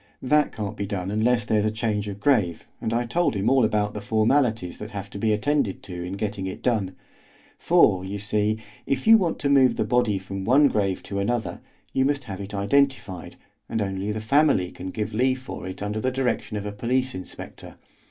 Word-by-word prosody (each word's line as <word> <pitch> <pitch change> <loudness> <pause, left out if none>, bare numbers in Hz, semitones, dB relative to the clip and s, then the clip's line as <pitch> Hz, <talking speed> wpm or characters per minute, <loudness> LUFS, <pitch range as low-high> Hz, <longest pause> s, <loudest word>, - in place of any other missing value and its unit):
That 150 +3 +3
can't 105 -2 -5
be 100 - -4
done 95 -2 -3
unless 115 +3 +2
there 110 -3 +2
is 105 - +1
a - - +3
change 105 -2 -2
of 100 -1 -6
grave, 105 - +1 0.2
and 110 - -2
I 120 +1 0
told 165 +3 +1
him 100 +5 +1
all 135 -2 +4
about 105 -1 +1
the 105 - -5
formalities 110 -2 +1
that 105 - -6
have 100 -1 -7
to 100 - -7
be 110 +1 +1
attended 110 0 0
to 90 -2 -7
in 90 +2 -5
getting 100 -1 -3
it 95 - -7
done; 105 -7 0 0.6
for, 90 -1 +4
you 95 +2 -4
see, 105 +1 0 0.3
if 135 -1 -1
you 225 0 +8
want 175 -4 0
to - - -1
move 135 -2 +4
a - - +3
body 120 -5 +2
from 95 0 -6
one 135 +6 +5
grave 100 -5 -1
to 100 - -4
another 115 +3 -2 0.3
you 130 - +2
must 145 +1 0
have 100 -4 -7
it 100 +1 -7
identified, 105 -3 0 0.3
and 115 - -1
only 100 0 -2
the 110 - -3
family 135 - +3
can 95 - -7
give 105 +2 -4
leave 130 +4 +2
for 130 -7 -7
it 95 +2 -6
under 105 +1 -2
the 130 - +1
direction 125 -4 -1
of 105 - -5
a 105 - -3
police 125 +5 -1
inspector. 95 - -9
110 Hz, 215 wpm, -25 LUFS, 100-125 Hz, 0.6 s, you